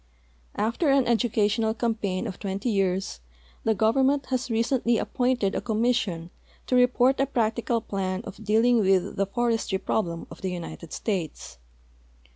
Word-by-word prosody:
After 230 - 0
an 275 -2 +4
edu 235 0 +1
cational 220 +1 +1
campaign 220 -6 -1
of 185 - -6
twenty 200 +4 -2
years 190 - 0 0.4
the 220 - +2
government 265 +7 +2
has 255 0 -1
recently 235 +1 +1
a[)[)ointed 245 -6 0
a - - -2
commission 220 -7 0 0.3
to 255 - 0
report 250 +1 +4
a 275 - +2
practical 230 -2 0
jilan 190 0 -3
of - - -9
dealing 225 +3 +3
with 190 -2 +2
the 195 0 +1
forestry 225 -2 0
problem 170 -4 -2
of - - -11
the 190 - -2
United 170 -2 -7
States. 165 - -4
220 Hz, 145 wpm, -26 LUFS, 195-245 Hz, 0.4 s, an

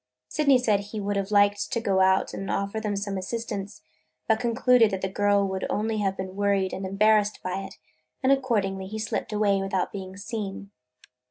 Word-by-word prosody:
Sydney 280 -3 +4
said 220 -5 +2
he 205 +2 -6
would 205 0 -2
have 200 0 -1
liked 205 0 +3
to 230 - 0
go 195 -4 +1
out 190 0 +3
and 195 - -5
offer 200 +2 -1
them 210 -2 -2
some 200 -1 -3
assistance; 205 0 -5 0.4
but 220 -1 +3
concluded 240 -1 +4
that 190 -2 -3
the - - +1
girl 200 +1 +2
would 190 0 -3
only 215 +1 -1
have 195 -2 -1
been 190 0 -5
worried 200 -2 +1
and 190 0 -4
embarrassed 210 +2 +3
by 185 +1 -2
it, - - -14 0.5
and 260 - +4
accordingly 205 -8 0
he 215 +3 -6
slipped 220 0 -3
away 205 -2 +2
without 195 -1 -1
being 190 -1 -7
seen. 200 -1 -5
200 Hz, 190 wpm, -26 LUFS, 195-220 Hz, 0.5 s, Sydney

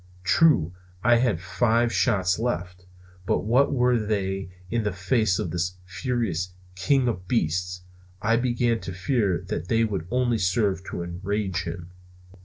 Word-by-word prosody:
True, 90 - +4 0.3
I 120 -1 +5
had 115 -8 +1
five 115 +6 +1
shots 95 -5 +2
left; 90 -6 -3 0.4
but - - +2
what 125 +7 +3
were 125 -3 +3
they 95 -3 -2 0.2
in 115 0 +1
the 105 -1 -1
face 95 +1 +1
of 85 - -3
this 90 +2 -2
furious 90 -2 -2 0.2
king 130 +7 +2
of 90 -6 -3
beasts? 90 -3 -1 0.4
I 110 +3 +2
began 120 -1 +1
to 95 - -6
fear 95 0 0
that 85 - -3
they 115 +2 +2
would 95 -7 -2
only 125 -1 +1
serve 95 0 +1
to 85 - -4
enrage 90 +1 -2
him. 85 +1 -6
100 Hz, 150 wpm, -25 LUFS, 90-120 Hz, 0.4 s, I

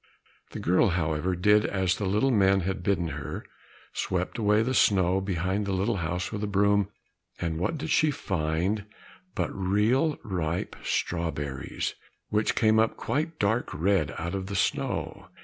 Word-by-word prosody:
The - - -7
girl, 90 +7 +3
however, 80 +2 0
did 105 +4 +4
as 95 -3 +1
the 100 - -2
little 105 +8 +2
men 95 -3 +4
had 95 +1 -2
bidden 90 -3 0
her, 70 -2 -6 0.5
swept - - -2
away 105 0 +3
the 130 +3 -1
snow 95 -5 +3
behind 95 +2 -1
the 100 - -1
little 100 +4 0
house 90 +1 -2
with 105 - -4
the 105 - -1
broom, 100 0 +2 0.5
and 80 -2 -2
what 95 - -1
did 155 +1 -4
she 155 - +4
find 95 - -1 0.5
but - - -1
real 105 - +2
ripe 85 -4 -2
strawberries, 75 -6 -2 0.4
which 105 +1 +1
came 110 -1 +4
up 110 0 +2
quite 155 +2 -2
dark 110 +4 +1
red 90 -2 +1
out 85 +2 -3
of 95 -1 -3
the 100 - -4
snow! 90 - -1
95 Hz, 160 wpm, -27 LUFS, 90-105 Hz, 0.5 s, did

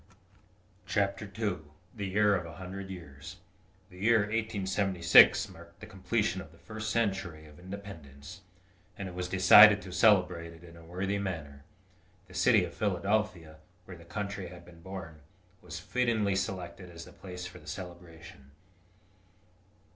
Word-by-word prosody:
CHAPTER 100 0 0
II 105 -5 -1 0.4
THE 100 -3 -4
YEAR 105 +2 +3
OF 85 -3 -3
A 80 - -10
HUNDRED 95 +1 -7
YEARS 85 -2 -10 0.6
The 90 - -14
year 115 +2 +4
1876 100 -4 +4
marked 85 +1 -15
the - - -9
completion 95 -1 -1
of 80 - -13
the 85 - -19
first 110 +4 -6
century 95 -8 -1
of 75 +1 -16
independence, 90 -4 -10 0.6
and 100 - -5
it 90 - -8
was 90 0 -4
decided 105 +3 +8
to 95 - -9
celebrate 90 -4 +3
it 85 +1 -16
in 85 -1 -13
a 85 - -14
worthy 95 +4 -3
manner. 75 -8 -5 0.6
The - - -16
city - - +4
of - - -9
Philadelphia, 100 -4 -1 0.3
where 95 - -10
the 85 - -14
country 100 +1 -5
had 85 0 -12
been 85 -1 -16
born, 85 -4 -8 0.4
was 85 - -8
fittingly 110 -1 0
selected 90 -1 -4
as 85 -1 -10
the - - -14
place 90 -1 -8
for 90 - -9
the 75 - -18
celebration. 85 -5 -10
95 Hz, 150 wpm, -30 LUFS, 85-100 Hz, 0.6 s, decided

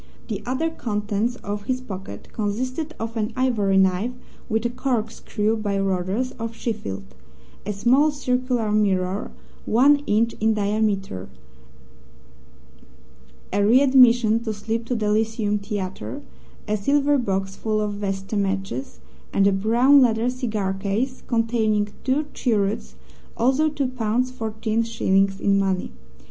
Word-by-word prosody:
The 205 -2 -3
other 275 +6 0
contents 210 -2 -2
of 205 0 -4
his 255 -1 -1
pocket 195 -6 -8
consisted 255 +9 -3
of 225 +1 -4
an 220 0 -1
ivory 225 -7 +2
knife 190 +5 +2 0.4
with 220 +1 0
a - - +2
corkscrew 225 -3 -1
by 205 -2 -1
Rodgers, 195 +6 -1
of 230 0 -4
Sheffield; 215 - -4 0.6
a - - 0
small, 245 +9 +3
circular 250 -5 -1
mirror, 195 -2 +1 0.4
one 275 +6 +5
inch 225 +2 +2
in 220 0 +2
diameter; 200 - -1 2.2
a 200 +1 +2
readmission 240 -2 +5
slip 225 +2 -3
to 245 - -1
the 210 -2 0
Lyceum 215 -1 0
Theatre; 190 - -5 0.4
a 215 - +1
silver 285 +6 +2
box 195 -4 -2
full 215 0 -1
of 210 -1 -1
vesta 195 0 -3
matches, 195 - -2 0.3
and 195 - +3
a 200 - +5
brown 235 +8 +5
leather 235 0 +2
cigar 215 -7 -2
case 210 +7 -2
containing 225 -3 +1
two 275 +4 +1
cheroots 210 -4 -1 0.4
also 265 +6 +3
two 290 -2 -2
pounds 250 +1 -1
fourteen 220 -2 -2
shillings 195 -4 +1
in 195 -1 +3
money. 190 -2 -1
220 Hz, 130 wpm, -23 LUFS, 200-245 Hz, 2.2 s, one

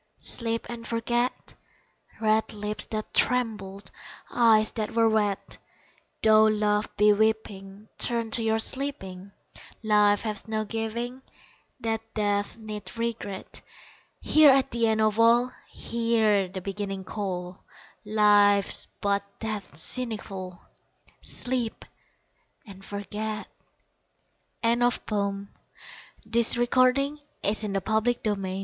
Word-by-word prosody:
Sleep 230 -1 -1
and 235 -1 -7
forget 240 +2 -2 0.7
Red 220 0 +1
lips 210 0 -2
that 215 -1 -5
trembled 215 -6 0 0.4
Eyes 220 -2 +4
that 215 -2 -4
were 230 -1 +4
wet 210 -3 -1 0.6
Though 220 0 +6
love 210 -1 +1
be 210 0 +5
weeping, 205 -1 -2
Turn 230 -2 -1
to 230 - +3
your 220 0 +1
sleeping, 200 -7 -3 0.5
Life 210 -1 +3
has 215 -1 -4
no 215 0 -2
giving 235 +4 -4 0.6
That 225 -1 -1
death 205 0 -1
need 215 0 -8
regret. 230 -4 -4 0.6
Here 310 -1 +6
at 270 -1 +3
the 230 -1 +1
end 220 0 +1
of 215 0 +1
all 240 +2 +4 0.2
Hear 225 -4 +1
the 185 +1 -7
Beginning 195 0 -5
call, 185 -2 -5 0.4
Life's 205 -2 +3
but 200 0 +1 0.2
death's 210 -8 -5
seneschal 195 -7 -2 0.6
Sleep 245 -3 -3 0.8
and 195 -2 -13
forget! 210 +2 -5 1.2
The 230 0 +4
Tyrant 245 -1 0
ONE 200 -1 -2 0.8
comes 235 0 +6
with 240 0 0
foot 255 0 +5 0.5
insistent 210 -1 0
215 Hz, 105 wpm, -26 LUFS, 205-230 Hz, 1.2 s, Though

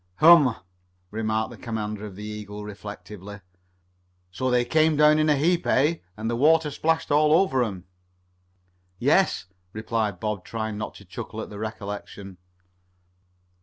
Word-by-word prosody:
"Hum," 155 - +7 0.6
remarked 110 0 -1
the - - -10
commander 105 -2 -4
of 95 - -11
the 105 - -9
Eagle 105 -1 -7
reflectively. 105 -1 -9 0.9
"So 130 +8 -2
they 125 -1 +2
came 155 +3 +3
down 150 0 +5
in 155 0 +2
a 150 - +5
heap, 170 +5 +1
eh, 150 +6 +3 0.2
and 110 +1 -4
the 120 - 0
water 155 +4 +3
splashed 160 +2 0
all 150 +1 +4
over 160 -7 +3
'em?" 95 -6 -5 1.1
"Yes," 145 - +2 0.3
replied 110 -3 -2
Bob, 105 -2 -3
trying 110 -1 -4
not 105 +1 -5
to 100 - -14
chuckle 110 +4 -7
at 110 - -6
the 100 - -8
recollection. 100 -3 -7
110 Hz, 145 wpm, -25 LUFS, 105-150 Hz, 1.1 s, Hum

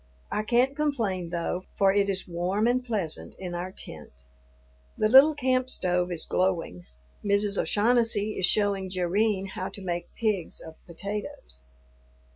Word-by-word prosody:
I 210 - 0
can't 245 +5 +2
complain, 225 - -1
though, 175 +2 -3
for 195 -1 +4
it 200 0 +2
is 190 -1 -1
warm 180 +5 -1
and 250 +1 +2
pleasant 205 -10 -3
in 180 -2 -6
our 175 +2 -4
tent. 65 - -11 0.7
The 215 - +2
little 270 +7 +7
camp 255 -2 +1
stove 180 -5 0
is 165 -2 +2
glowing. 170 - -1 0.4
Mrs. 200 0 +3
O'Shaughnessy 220 -1 +1
is 185 -3 +1
showing 200 -2 +1
Jerrine 190 +2 0
how 185 - -4
to 200 - -9
make 175 -1 -4
pigs 210 -7 -2
of 160 - -10
potatoes. 170 - -6
195 Hz, 145 wpm, -27 LUFS, 180-220 Hz, 0.7 s, little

